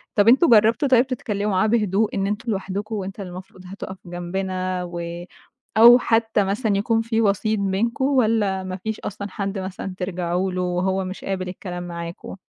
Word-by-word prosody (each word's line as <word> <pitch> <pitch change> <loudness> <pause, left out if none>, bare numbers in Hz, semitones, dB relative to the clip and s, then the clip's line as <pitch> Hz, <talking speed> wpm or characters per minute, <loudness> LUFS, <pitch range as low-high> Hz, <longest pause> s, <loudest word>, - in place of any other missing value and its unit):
طَب 205 +1 +4
أنتم 275 +7 +6
جربتم 225 +5 +5
طيب 255 0 +4
تتكلموا 210 -5 -2
معاه 190 +3 +2
بهدوء، 215 -2 +1
إن 195 0 0
أنتم 210 +3 -2
لوحدكم 200 +2 -3
وأنت 195 0 -5
المفروض 185 0 -9
هتُقف 190 0 -7
جنبنا 185 +1 -3
و 170 0 -6 0.5
أو 240 +2 +9
حتى 225 -3 +2
مثلًا 205 +1 0
يكون 225 +2 +1
في 225 0 0
وسيط 210 +1 +1
بينكم؟ 220 +7 0
والّا 220 -8 +2
ما 185 0 -5
فيش 220 +3 -4
أصلًا 200 0 -6
حدّ 195 -1 -3
مثلًا 190 0 -5
ترجعوا 180 0 -2
له، 180 0 -2
وهو 185 +2 0
مش 185 +1 -7
قابل 185 -2 -3
الكلام 180 -1 -6
معاكم؟ 170 +1 -7
195 Hz, 170 wpm, -22 LUFS, 185-220 Hz, 0.5 s, أو